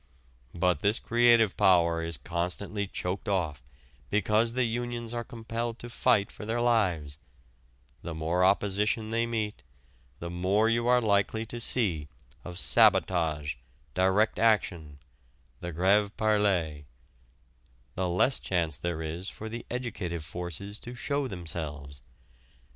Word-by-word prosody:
But 90 -3 +2
this 105 +4 +2
creative 120 -3 +4
power 85 -3 +4
is 80 -2 -2
constantly 90 +7 -3
choked 95 +2 -4
off 80 -9 -1 0.5
because 105 +3 +2
the 130 +1 +1
unions 120 0 -3
are 120 0 -2
compelled 115 -1 -5
to 120 0 -9
fight 100 -3 +2
for - - -10
their 115 +3 -1
lives 90 -12 +1 0.8
the 85 -2 -6
more 80 +3 0
opposition 105 +3 +2
they 115 +1 +1
meet 110 -7 -3 0.6
the 85 0 -6
more 95 +5 +2
you 115 +1 +1
are 125 0 +5
likely 110 +1 +1
to 120 +1 -6
see 95 - +1 0.4
of 90 -1 -8
sabotage, 85 - +3 0.4
direct 95 +4 +2
action, 90 -10 +1 0.6
the 85 - -5
grève 100 +5 +3
perlée 95 -9 +1 1.1
the 95 -1 -1
less 90 +10 +2
chance 85 -5 -1
there 85 -1 -3
is 85 +5 -3
for 110 - -8
the 115 +1 -7
educative 100 -10 -4
forces 90 +5 -5
to 120 +1 -8
show 140 +2 -1
themselves. 75 - -6
100 Hz, 130 wpm, -28 LUFS, 85-115 Hz, 1.1 s, are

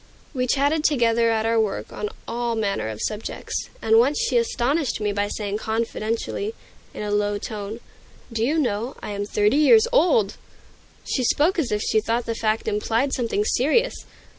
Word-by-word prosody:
We 255 -2 -1
chatted 285 +4 +2
together 235 -6 +3
at 220 -1 +1
our 230 0 +2
work 215 -3 -2
on 210 - -3 0.2
all 235 0 -2
manner 200 - -1
of 110 -1 -6
subjects, 210 0 -4
and 225 0 +5
once 275 +5 +3
she 470 +1 0
astonished 305 - +1
me 210 -1 -1
by 205 0 0
saying 205 0 -3
confidentially, 230 - -2 0.4
in - - -6
a 210 - -3
low 205 0 +1
tone, 210 +2 -6 0.5
"Do 225 -1 0
you 295 +7 +1
know, 240 -3 -1
I - - -5
am 205 0 -3
thirty 210 +5 +2
years 440 +10 +6
old!" 325 - +3 0.7
She 255 - -1
spoke 315 +9 +2
as 285 - -1
if 210 0 0
she 220 - +2
thought 230 +2 -1
the 230 - -2
fact 220 -1 -1
implied 225 +5 0
something 230 -4 0
serious. 310 - +2
230 Hz, 175 wpm, -23 LUFS, 210-280 Hz, 0.7 s, years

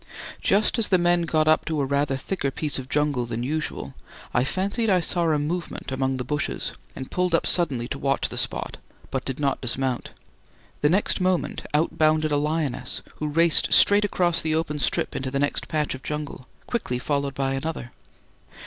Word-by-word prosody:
Just 210 +4 +3
as 225 - +3
the 185 - +4
men 175 0 +3
got 155 -1 +2
up 155 0 +4
to 160 -2 -1
a 140 - +1
rather 140 0 0
thicker 140 0 -2
piece 145 0 -2
of 130 0 -8
jungle 145 -5 +1
than 115 0 -3
usual, 155 +4 -3 0.4
I 125 - +3
fancied 200 - 0
I 185 -2 +4
saw 175 0 0
a 155 - +3
movement 160 -1 -3
among 130 0 0
the 125 - -2
bushes 150 +3 -2 0.2
and 130 - -7
pulled 180 -2 +1
up - - +1
suddenly 135 -9 +2
to 135 - -4
watch 135 0 +1
the - - -8
spot, - - -2 0.3
but 130 -1 -2
did 135 0 -4
not 140 -2 0
dismount. 125 0 -1 0.7
The 145 - +4
next 190 +2 +1
moment 185 -1 0
out 155 +3 0
bounded 155 0 +3
a 145 - +3
lioness, 150 -2 -1
who 150 - -2
raced 165 +2 +3
straight 205 +1 +7
across 175 -4 +1
the 155 0 0
open 155 -2 -1
strip - - 0
into 130 - -2
the 135 - -2
next 145 +1 -1
patch 150 -1 -1
of 130 - -8
jungle, 150 -4 -5 0.2
quickly 205 - -2
followed 140 +1 -1
by 135 0 0
another. 135 -3 -4
150 Hz, 195 wpm, -25 LUFS, 135-170 Hz, 0.7 s, straight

